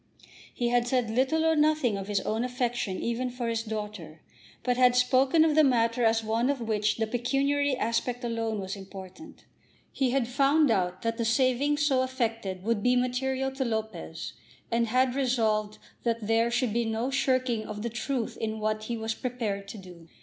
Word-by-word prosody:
He 240 -1 -1
had 240 0 +2
said 245 -3 0
little 270 +7 +1
or 320 0 +3
nothing 300 -7 +2
of 195 0 -5
his 205 -2 0
own 220 +2 -1
affection 245 -6 -2
even 235 +2 -1
for 245 -1 -4
his 230 -1 0
daughter, 210 -7 -6 0.4
but 250 -1 +1
had 250 -1 +4
spoken 260 +5 +4
of 315 - +2
the 310 +1 +5
matter 240 -2 +2
as 225 0 +3
one 225 +4 0
of 285 -2 0
which 215 -2 0
the 225 - +1
pecuniary 275 +4 0
aspect 245 +1 -1
alone 225 -2 -2
was 190 0 -4
important. 195 - -11 0.5
He 265 -2 0
had 250 -2 +1
found 275 +2 +3
out 185 -3 0
that 230 +1 -2
the - - +1
saving 255 +5 +2
so 290 -3 +2
effected 230 -7 -2
would 225 -1 0
be 245 +3 +3
material 260 +2 0
to 265 0 -2
Lopez, 220 -8 -4 0.4
and 230 0 +2
had 255 +2 +2
resolved 220 -6 0 0.2
that 230 -2 -1
there 225 +2 +2
should 240 -2 0
be 235 +1 +1
no 225 +3 -2
shirking 255 -4 0
of 210 0 -6
the 235 - -1
truth 240 +1 -3
in 220 -1 -3
what 215 0 -1
he 235 0 -3
was 220 0 -2
prepared 220 -6 -3
to 205 - -8
do. 180 -4 -13
235 Hz, 185 wpm, -28 LUFS, 220-255 Hz, 0.5 s, the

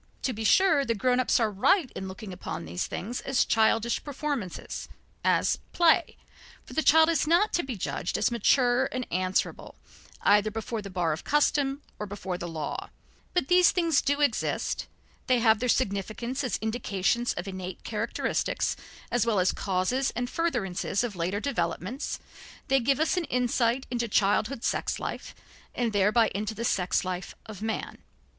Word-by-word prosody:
To 255 - 0
be 220 0 -5
sure, 320 - +4
the 230 -3 0
grown 250 +4 +2
ups 255 - +3
are 225 -2 +1
right 255 - +2
in 190 - -5
looking 190 +1 -8
upon 175 - -6
these 85 +2 -3
things 235 +6 -4
as 270 -1 +1
"childish 225 +1 +2
performances," 280 - -4 0.3
as - - +2
"play," 345 0 +3 0.5
for - - -11
the 315 - +1
child 320 +1 +6
is 325 -3 +1
not 350 +6 +3
to 345 - +2
be 265 -5 -5
judged 175 - -2
as - - +1
mature 245 +2 +3
and 255 -1 -3
answerable 185 +1 -1 0.5
either 210 +1 +4
before 225 +1 -4
the 200 - -8
bar 175 -4 0
of 155 - -6
custom 285 -1 +1 0.2
or 210 - -4
before 190 -2 -5
the 175 - -4
law, 160 -3 -5 0.5
but 355 -7 +2
these 360 -1 +6
things 335 -5 +2
do 285 +1 0
exist, 270 -6 0 0.4
they 255 -2 +4
have 225 -2 +4
their 250 - -1
significance 235 +4 -1
as 255 - -1
indications 220 +1 0
of 175 +3 -5
innate 185 -1 -6
characteristics - - -1 0.4
as 245 - +2
well 215 -4 +2
as 185 - +3
causes 200 +8 0
and 245 +1 -2
furtherances 240 - -1
of 230 -5 -3
later 180 +4 -1
developments, 215 - -2 0.5
they 270 0 +4
give 270 +3 +1
us 320 +3 +1
an 350 - 0
insight 245 0 +1
into 240 -1 -1
childhood 215 +4 +1
sex - - -1
life - - -6 0.4
and 235 -3 0
thereby 210 +3 +3
into 215 +2 -3
the 235 - -3
sex 185 -3 +1
life 180 0 -4
of 210 -3 -9
man. 220 0 -3
230 Hz, 170 wpm, -27 LUFS, 195-270 Hz, 0.5 s, child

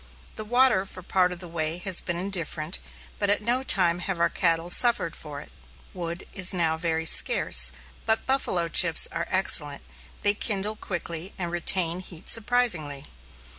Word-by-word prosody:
The 215 - -6
water 245 -2 +2
for 185 - -8
part 180 0 0
of 180 0 -7
the 180 - -9
way 165 0 -3
has 185 0 +1
been 175 -1 -5
indifferent, 175 -3 -3 0.4
but 205 - -2
at 205 - +1
no 240 +4 0
time 180 -9 +1
have 180 -1 -4
our 170 0 0
cattle 165 +1 -1
suffered 225 -9 +2
for 145 -2 -9
it. - - -15 0.4
Wood 170 0 -6
is 190 -1 +2
now 165 -2 0
very 160 0 -3
scarce, 65 - +3 0.4
but 220 0 -1
"buffalo 225 -10 -1
chips" 165 -1 +6
are 165 0 -5
excellent; 150 -6 +2 0.4
they 205 - +4
kindle 210 0 -2
quickly 175 -3 -7
and 175 -3 -5
retain 175 0 +1
heat 175 -3 -10
surprisingly. 205 - +2
175 Hz, 165 wpm, -24 LUFS, 165-200 Hz, 0.4 s, chips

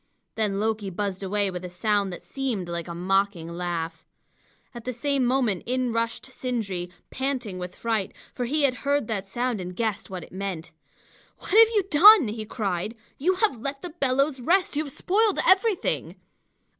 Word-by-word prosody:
Then 210 -3 -1
Loki 215 -2 -1
buzzed 195 +1 -3
away 200 0 0
with 180 0 -6
a 180 - -5
sound 200 +2 0
that 175 - -8
seemed 245 -10 -3
like 170 -1 -4
a 170 - -6
mocking 190 -1 0
laugh. 170 -1 -4 0.7
At 240 -1 -8
the 255 - -3
same 275 +2 0
moment 245 -7 +1
in 250 -1 0
rushed 230 0 -1
Sindri, 220 -9 -3 0.2
panting 255 -8 -3
with 180 0 -6
fright, 225 -4 -1 0.2
for 245 - -2
he 295 +5 0
had 275 -2 +4
heard 285 -1 +1
that 200 -3 -2
sound 240 -1 -1
and 180 0 -6
guessed 220 -1 -2
what 185 -3 -6
it - - -14
meant. 185 -3 -5 0.7
"What - - -9
have 445 +3 +8
you 410 - +4
done?" 360 - +8
he 215 0 -5
cried. 210 -1 -3 0.2
"You 365 +7 +2
have 365 - +1
let 275 +1 -4
the 355 - -5
bellows 275 -2 +1
rest! 350 +6 +2
You 305 +2 0
have 280 - -6
spoiled 415 +7 +2
everything!" 380 +2 +2
225 Hz, 180 wpm, -25 LUFS, 190-275 Hz, 0.7 s, have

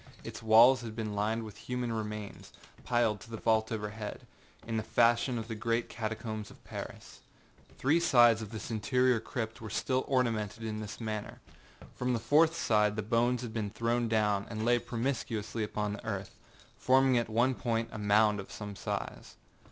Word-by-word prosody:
Its - - -7
walls 115 +4 +7
had 115 -2 -7
been 110 -2 -3
lined 110 +3 -1
with 105 -2 -9
human 125 0 -3
remains, 105 -2 -6 0.3
piled 120 -3 +1
to - - -13
the 115 - -5
vault 110 0 +1
overhead, 105 -1 -5 0.4
in 115 -1 -2
the - - +1
fashion 120 +3 +2
of 110 -1 -5
the 115 - -4
great 115 +2 -1
catacombs 110 -1 -4
of - - -17
Paris. - - -8 0.6
Three 150 +6 +3
sides 120 -9 +5
of 110 - -6
this 110 +1 -6
interior 125 +2 +2
crypt 110 -1 -5
were 110 - -6
still 130 +5 0
ornamented 115 -5 0
in 110 -1 -3
this 105 -1 -7
manner. 110 -2 -5 0.5
From 125 0 -1
the 115 - 0
fourth 160 +8 +3
the 105 -1 +2
bones 120 +1 +2
had 115 -2 -6
been 110 -2 -2
thrown 115 +2 0
down, 105 -3 +1
and 110 -1 -3
lay 120 0 +4
promiscuously 115 -2 -3
upon 105 0 -2
the 105 - -8
earth, 100 -3 -4 0.5
forming 130 0 +4
at 115 - -3
one 120 +4 +2
point 115 -2 -1
a - - -6
mound 105 0 +3
of 100 - -8
some 105 -1 -7
size. - - -5
115 Hz, 175 wpm, -31 LUFS, 105-120 Hz, 0.6 s, walls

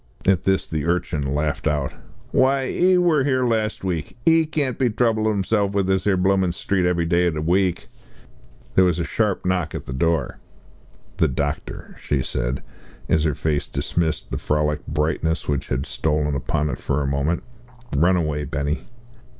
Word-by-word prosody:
At 95 -2 +3
this 95 0 +2
the 80 0 -2
urchin 85 -3 0
laughed 75 0 -1
out. 75 -3 0 0.4
"Why, 135 +1 +3
'e 185 +6 +3
wor 170 -6 +3
here 130 -2 +1
last 110 -4 0
week! 90 +2 -3
Ee 165 -1 +5
can't 145 -5 -1
be 130 -2 +3
troublin' 110 -2 +1
'isself 105 0 +2
about 100 -1 +2
this 95 0 +1
'ere 95 -2 +3
bloomin' 95 -1 +2
street 95 +1 0
_ev_ery 85 -2 +1
day 90 +1 +3
in 85 - -1
the 75 - -2
week." 90 +1 +1 0.9
There 95 - +5
was 90 -3 +2
a 85 - 0
sharp 95 - -1
knock 90 -3 0
at - - -5
the 65 - -5
door. 80 0 0 0.8
"The - - +3
doctor," 70 0 -4
she 70 -3 0
said, - - -2 0.5
as 80 - +3
her 75 -3 +1
face 75 -2 -1
dismissed 80 -2 -2
the - - -2
frolic 75 0 0
brightness 80 +2 -1
which 70 -2 -1
had 65 +2 -1
stolen 75 -1 0
upon 75 +2 -1
it - - -5
for 70 +1 -1
a - - -2
moment. 70 +5 0 0.5
"Run 85 +6 +4
away, 75 -3 -1
Benny." 70 +2 -2
85 Hz, 175 wpm, -22 LUFS, 75-100 Hz, 0.9 s, Ee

